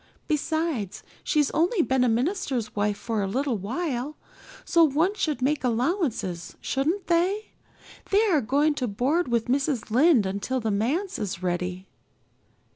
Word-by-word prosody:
Besides, 310 - -1 0.2
she's 300 -3 +2
only 345 +4 +2
been 265 -3 +2
a 250 - +3
minister's 255 - -1
wife 205 0 0
for 225 -3 -2
a 195 - -1
little 255 +2 -1
while, 265 - -3 0.5
so 335 -1 +4
one 320 +6 +2
should 305 - -2
make 290 +1 +1
allowances, 235 - -1
shouldn't 320 +9 -1
they? 365 +5 +1 0.6
They 415 +3 +4
are 305 -4 +3
going 285 +6 +2
to 250 - +1
board 260 +11 0
with 235 -2 +1
Mrs. 265 -3 -1
Lynde 260 - +5
until 200 +7 -2
the 220 -2 -1
manse 280 - -1
is 190 -4 -4
ready." 180 +1 -2
265 Hz, 145 wpm, -26 LUFS, 220-320 Hz, 0.6 s, Lynde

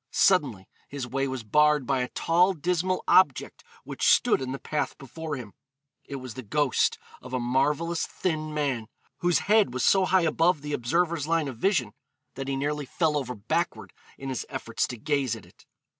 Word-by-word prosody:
Suddenly 130 - +2 0.2
his 140 -3 -4
way 135 +3 -1
was 130 -3 -4
barred 150 +4 +3
by 135 +1 +1
a 125 - -1
tall 175 +8 +2
dismal 180 +3 -1
object 170 -8 +3 0.2
which - - -2
stood - - +4
in 130 -1 -3
the 135 - -3
path 150 +2 -3
before 150 +3 -6
him. 120 -7 -8 0.5
It 140 - -7
was 130 -3 -7
the 130 - -7
ghost 135 +4 +1 0.2
of 130 0 -10
a - - 0
marvellous 145 +7 0
thin 155 -4 -2
man, 140 -7 -1 0.3
whose 175 -1 +2
head 210 - +3
was 125 - 0
so 190 -1 +4
high 185 -1 +3
above 165 -1 +2
the 150 0 -4
observer's 160 +4 0
line 165 -2 +1
of 130 -4 -6
vision 140 - +1 0.4
that 135 0 -6
he 135 - -1
nearly 145 +1 -2
fell 160 0 0
over 125 -4 -2
backward 160 +12 -2 0.2
in 135 - -6
his 130 - -3
efforts - - -2
to 125 - -7
gaze 135 0 0
at - - -12
it. - - -22
145 Hz, 190 wpm, -27 LUFS, 130-165 Hz, 0.5 s, stood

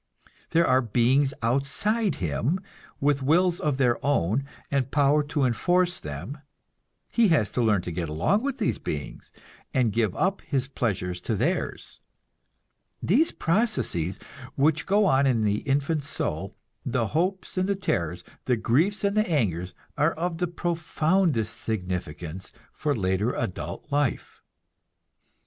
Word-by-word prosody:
There 170 +1 +3
are 130 -3 +4
beings 125 +4 +2
outside 140 - +1
him, 95 - -1 0.4
with 140 0 +2
wills 175 +6 +3
of 145 -3 0
their 125 -3 +1
own, 135 -2 +1 0.3
and 135 -2 +1
power 145 +1 +3
to 145 -1 -1
enforce 175 +9 +2
them; 80 - -7 0.7
he 235 -2 +4
has 150 - +2
to 125 - 0
learn 105 -6 +2
to 90 - -4
get 85 -1 -3
along 85 - +1
with 275 0 -2
these - - 0
beings, - - -6 0.4
and 120 -5 +2
give 110 -5 +1
up 195 +1 0
his 135 -3 -1
pleasures 90 -9 -2
to 110 - -1
theirs. - - -2 1.0
These 270 - +3
processes 165 - 0 0.4
which 150 +2 +2
go 205 +2 +4
on 135 -6 +4
in 115 -4 +2
the 105 0 +1
infant 145 +2 +1
soul, 140 - -3 0.3
the - - -1
hopes 185 +4 -1
and 185 +1 0
the 200 - +2
terrors, 90 - -2 0.2
the 125 -2 +2
griefs 165 - +1
and 200 0 +1
the 215 -2 +2
angers, 90 - 0 0.2
are 150 +3 +3
of 165 0 -3
the 180 - +1
profoundest 165 - 0
significance 90 -4 -4 0.2
for 145 -2 -1
the - - -4
later 95 +6 +1
adult 105 -6 -4
life. 145 -3 -1
140 Hz, 145 wpm, -26 LUFS, 110-170 Hz, 1.0 s, are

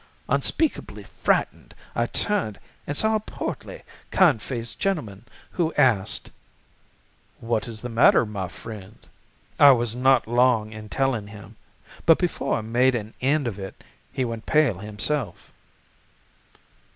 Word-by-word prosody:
Unspeakably 320 -2 -1
frightened, - - -1 0.2
I - - +1
turned 200 - -1 0.3
and 145 - -2
saw 220 0 +3
a - - -4
portly, 215 - -6 0.3
kind 155 - +4
faced 115 -4 -4
gentleman, 120 - -2 0.3
who 170 -3 -1
asked: 110 -5 +2 1.1
"'What 115 -1 -1
is 110 -2 -5
the - - -3
matter, 115 0 +5
my 100 -3 -4
friend?' 105 +2 -11 0.5
"I 140 -1 +9
was 120 -2 -1
not 130 -1 +3
long 120 -2 +2
in 110 -1 -9
telling 125 -4 -1
him, 105 0 -12 0.5
but 165 - +7
before 175 -6 -1
I - - -3
made 120 +4 +2
an 110 -1 -5
end 140 +2 +2
of 105 -4 -4
it 95 -1 -9 0.3
he 130 - -1
went 115 -2 -6
pale 150 - +3
himself. 105 +6 -4
120 Hz, 135 wpm, -24 LUFS, 105-135 Hz, 1.1 s, I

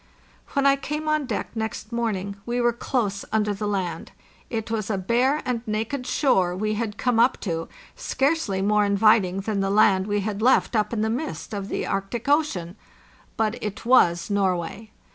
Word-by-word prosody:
When 280 0 +1
I 275 0 +5
came 300 +2 -4
on 305 -3 +1
deck 225 - -3
next 220 -1 -4
morning 205 -4 -2
we 240 +2 -2
were 240 -1 +2
close 220 -4 -2
under 210 -1 +1
the 205 +1 -3
land. 190 -4 -3 0.4
It 225 -1 -4
was 220 -2 -2
a 205 - 0
bare 245 +10 +1
and 245 -2 -1
naked 225 +5 -2
shore 185 - +2
we 215 +3 -1
had 210 -1 -3
come 245 -3 +1
up 245 +3 +4
to, 165 -4 -3 0.3
scarcely 270 -10 0
more 210 +1 +3
inviting 200 -2 +3
than 205 0 -2
the 195 0 0
land 195 -2 +4
we 205 0 0
had 205 +1 -3
left 250 0 +3
up 215 -1 +1
in 225 -2 -1
the 220 0 +1
mist 260 -2 -4
of 200 -1 -4
the - - -3
Arctic 195 +5 -3
Ocean—but 220 - -2
it 210 +1 -5
was 175 -8 +4
Nor 195 -2 +2
way. 210 +6 -7
215 Hz, 180 wpm, -24 LUFS, 200-240 Hz, 0.4 s, I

